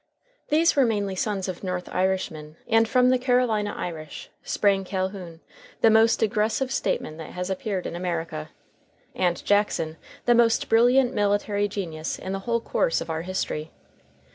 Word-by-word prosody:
These 325 +2 +3
were 280 - +5
mainly 205 -5 0
sons 195 0 -2
of 185 0 -6
North 180 -1 -3
Irishmen, 180 -5 -1
and 225 0 +3
from 250 0 +4
the 255 - +3
Carolina 245 -5 +1
Irish 155 -3 -6
sprang 195 -2 +1
Calhoun, 185 -3 -4 0.4
the 225 - +6
most 225 +1 +4
aggressive 220 +4 0
statesman 155 - -2
that 160 - -9
has 180 +1 -3
appeared 190 -1 -3
in - - -4
America, 170 - -3 0.6
and 175 -1 -1
Jackson, 200 -6 +1 0.3
the 240 - +5
most 235 -1 +3
brilliant 245 +3 +4
military 205 -1 +1
genius 165 -6 -4
in 190 - -6
the 195 - -2
whole 235 0 +1
course 165 - 0
of - - -5
our 160 0 -2
history. 170 -3 -3
200 Hz, 155 wpm, -25 LUFS, 180-225 Hz, 0.6 s, the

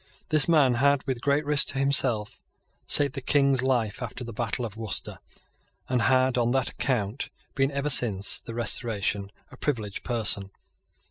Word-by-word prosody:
This 155 -3 +3
man 145 -6 +4
had, 140 -1 +2
with 130 -3 -3
great 145 +2 +1
risk 145 -1 +4
to - - +1
himself, 130 -6 +1 0.5
saved 140 -2 +5
the 135 - -5
King's 140 -1 +3
life 125 -4 -1
after 125 +1 -6
the 115 -1 -8
battle 120 +2 -3
of 110 -2 -8
Worcester, 110 -3 -5 0.7
and 125 -2 0
had, 130 0 +2
on 120 0 +1
that 135 -1 +1
account, 120 -2 -2 0.3
been, 135 -1 +1
ever 140 +1 -1
since 105 -7 +2
the 115 - -9
Restoration, 105 -3 -1 0.2
a - - -13
privileged 110 -9 -3
person. 105 -5 0
125 Hz, 160 wpm, -26 LUFS, 110-140 Hz, 0.7 s, saved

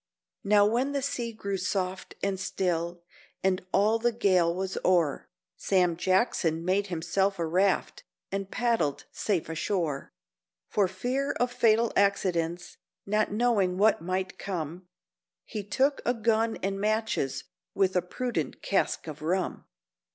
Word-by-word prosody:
Now 205 0 +5
when 245 +6 +1
the 280 - 0
sea 240 -4 -2
grew 200 -3 -3
soft 185 0 -3
and 195 -1 0
still, 175 -2 -2 0.4
and 190 -1 +1
all 215 +3 +3
the 240 +1 +2
gale 185 -7 +3
was 190 +2 -3
o'er, 170 -6 +2 0.3
Sam 180 -3 +2
Jackson 175 -3 +1
made 195 +2 +1
himself 190 +3 0
a 170 - -1
raft, 185 +4 +1 0.3
and 195 0 -3
paddled 230 - 0
safe 195 -6 -1
ashore. 160 -3 -2 0.6
For 205 -3 +2
fear 250 +9 -1
of 245 0 0
fatal 230 -2 +3
accidents—not 195 +2 0
knowin' 210 -5 +2
what 210 -1 +4
might 185 +2 -3
come, 175 -1 -5 0.6
He 215 -3 -5
took 270 +8 +1
a 245 - +1
gun 225 0 +1
and 195 +1 -1
matches, 215 - 0 0.3
with 190 -1 +2
a 180 - +4
prudent 180 - -3
cask 195 - 0
of 155 -2 -8
rum. 180 +4 -1
195 Hz, 135 wpm, -28 LUFS, 180-220 Hz, 0.6 s, Now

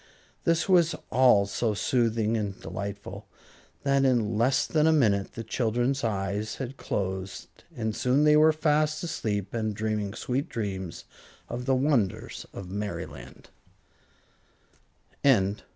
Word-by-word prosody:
This 165 0 +2
was 170 -4 +4 0.2
all 120 -5 +5
so 105 +2 -1
soothing 115 -1 +1
and 105 -3 -3
delightful 100 +4 -6 0.6
that 140 -1 +2
in 120 -5 +2
less 120 +5 +2
than 155 0 +2
a - - +5
minute 105 -10 +2
the 115 - -6
children's 120 +4 0
eyes 105 0 -2
had 130 0 -6
closed, 95 -5 -4 0.3
and 110 -2 -2
soon 130 +4 +2
they 150 0 +6
were 155 +1 +6
fast 155 0 +1
asleep 105 - -3
and 110 -2 -2
dreaming 105 -1 -2
sweet 135 +8 -2
dreams 95 -6 -4 0.4
of 120 +1 -5
the 135 - +3
wonders 120 -5 0
of 100 - -8
Merryland. 85 -10 -6
115 Hz, 125 wpm, -27 LUFS, 100-135 Hz, 0.6 s, they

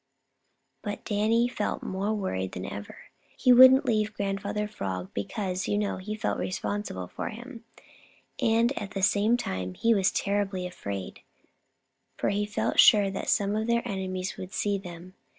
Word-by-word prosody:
But 205 -1 -5
Danny 220 +3 +2
felt 230 -4 -3
more 195 +3 -2
worried 95 - -3
than 90 - -5
ever. 100 +1 -7 0.4
He 250 - +5
wouldn't 260 +2 +8
leave 215 -2 0
Grandfather 200 +1 -2
Frog 95 - -5
because, 185 - -3
you 205 - +1
know, 205 -1 -1
he 210 +3 -5
felt 215 - -2
re - - -2
spon 205 +2 -2
sible 95 - -6
for - - -4
him, 235 +1 -10 0.8
and 230 +4 +3
at 205 0 -7
the 195 - -2
same 210 +4 +3
time 95 - -4
he 230 0 +3
was 195 -3 +2
terribly 200 -2 -1
afraid, 100 - -6 1.0
for - - 0
he 205 +1 0
felt 210 - -1
sure 205 -3 +7
that 195 - -4
some 200 0 +2
of 220 +1 -1
their 235 0 +1
enemies 185 -1 -3
would 185 +1 -8
see 205 -1 0
them. 180 -1 -10
205 Hz, 170 wpm, -27 LUFS, 185-215 Hz, 1.0 s, wouldn't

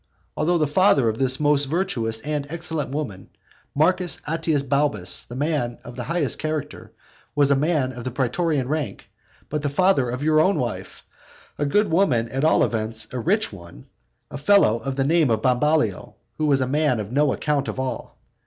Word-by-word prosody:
Although 170 +3 +1
the 155 - +2
father 150 - +3
of 110 - -4
this 130 -1 +1
most 145 -1 +3
virtuous 135 - -1
and 145 0 -3
excellent 160 -3 -3
woman, 130 -10 -5 0.5
Marcus 180 +4 +2
Atius 160 -2 0
Balbus, 140 -11 -1
a 120 - -7
man 140 -4 -1
of 120 - -10
the 120 - -5
highest 165 -6 -1
character, 155 -2 -4 0.4
was 145 -1 +3
a - - +5
man 145 -2 +1
of 125 0 -6
praetorian 135 +2 0
rank; 145 -8 -3 0.4
but 150 0 -3
the 145 - -1
father 145 -4 +2
of 125 +3 -4
your 155 0 +3 0.2
wife, 100 -7 -4 0.6
a 145 - 0
good 205 +5 +2
woman, 135 -11 +2
at 135 +3 -3
all 160 - +4
events 110 0 -2
a 125 - -2
rich 200 - +1
one, 85 -9 -12 0.5
a 145 - -6
fellow 165 - +4
of 135 +1 -4
the 135 - +1
name 155 0 +3
of 110 -1 0
Bambalio, 130 - +1 0.2
was 145 -3 +2
a 130 - 0
man 145 -3 +1
of 105 +1 -5
no 145 +1 +2
account 145 -1 -1
at - - -5
all. 130 -2 -5
140 Hz, 180 wpm, -23 LUFS, 125-155 Hz, 0.6 s, a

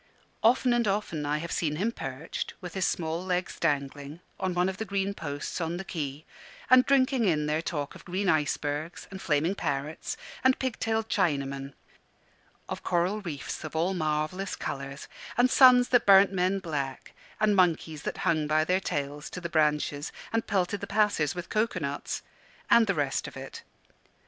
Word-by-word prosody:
Often 245 +2 +4
and 240 -2 +2
often 195 -7 -1
I 150 +1 +1
have 170 +2 -5
seen 150 -3 0
him 205 +9 0
perched, 135 - -5
with 180 -3 -8
his 190 - +1
small 165 +1 -2
legs 180 -1 -2
dangling, 145 0 -1 0.2
on 185 -1 -1
one 180 +1 +2
of 190 0 -3
the 220 - -2
green 200 -1 -1
posts 145 -1 -5
on 165 +1 -2
the 190 - -4
quay, 150 -4 -4 0.5
and 255 0 +9
drinking 265 -3 +3
in 155 -5 +2
their 155 +1 0
talk 150 -3 -3
of - - -13
green 190 +3 -2
icebergs, 150 0 -1
and 190 0 -7
flaming 155 +4 +1
parrots, 150 -4 -3 0.3
and 260 0 +4
pig 260 -3 -3
tailed 225 0 0
Chinamen; 140 -8 -1 0.9
of - - -5
coral 180 +4 0
reefs 155 -6 -5
of 155 0 -7
all 170 +4 +1
marvellous 155 +3 -1
colours, 135 0 -5 0.3
and 245 +1 +4
suns 250 -2 +7
that 245 -4 +3
burnt 195 0 +7
men 185 +1 +1
black, 145 -8 -4 0.3
and 215 -1 +3
monkeys 165 -4 +2
that - - -4
hung 155 -2 +2
by 155 +1 +3
their 180 +4 +2
tails 145 -5 -3
to - - -6
the 170 -1 -5
branches 150 -2 +1 0.2
and 225 0 0
pelted 195 0 0
the - - -4
passers 205 -9 +2
by - - -13
with 175 - -5
coco 215 -2 0
nuts; 140 -2 -4 0.5
and 230 -1 +7
the 195 - +1
rest 140 -3 -1
of - - -9
it. - - -8
170 Hz, 180 wpm, -28 LUFS, 150-200 Hz, 0.9 s, and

